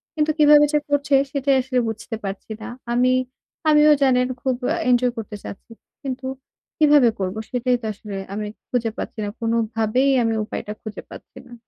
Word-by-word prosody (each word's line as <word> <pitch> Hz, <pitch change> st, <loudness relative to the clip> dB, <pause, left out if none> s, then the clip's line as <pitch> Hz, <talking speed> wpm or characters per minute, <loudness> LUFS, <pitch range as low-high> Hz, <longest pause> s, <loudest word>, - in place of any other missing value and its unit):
কিন্তু 310 Hz, 0 st, +2 dB
কীভাবে 295 Hz, -1 st, +7 dB
যে 300 Hz, -, +4 dB
করছে 285 Hz, 0 st, 0 dB, 0.2 s
সেটাই 275 Hz, -1 st, +1 dB
আসলে 255 Hz, 0 st, -1 dB
বুঝতে 225 Hz, +1 st, -5 dB
পারছি 195 Hz, +2 st, -6 dB
না। 220 Hz, -, -6 dB, 0.3 s
আমি 250 Hz, +1 st, +3 dB, 0.6 s
আমিও 300 Hz, 0 st, +6 dB
জানেন 250 Hz, -2 st, +3 dB
খুব 260 Hz, -1 st, 0 dB
অ্যা 330 Hz, -, 0 dB
এনজয় 250 Hz, 0 st, +3 dB
করতে 220 Hz, -1 st, -6 dB
চাচ্ছি। 200 Hz, -, -10 dB, 0.3 s
কিন্তু 260 Hz, -1 st, -4 dB, 0.5 s
কীভাবে 295 Hz, -5 st, +6 dB
করবো? 190 Hz, +2 st, -2 dB
সেটাই 250 Hz, 0 st, +1 dB
তো -, -, -7 dB
আসলে 205 Hz, 0 st, -9 dB, 0.2 s
আমি 210 Hz, +1 st, -3 dB, 0.2 s
খুঁজে 235 Hz, -3 st, 0 dB
পাচ্ছি -, -, -6 dB
না। 205 Hz, -, -2 dB
কোনোভাবেই 230 Hz, +3 st, +1 dB
আমি 225 Hz, -1 st, +1 dB
উপায়টা 210 Hz, -, -6 dB
খুঁজে 215 Hz, -1 st, -7 dB
পাচ্ছি -, -, -13 dB
না। 245 Hz, -, -14 dB
250 Hz, 170 wpm, -22 LUFS, 225-275 Hz, 0.6 s, কীভাবে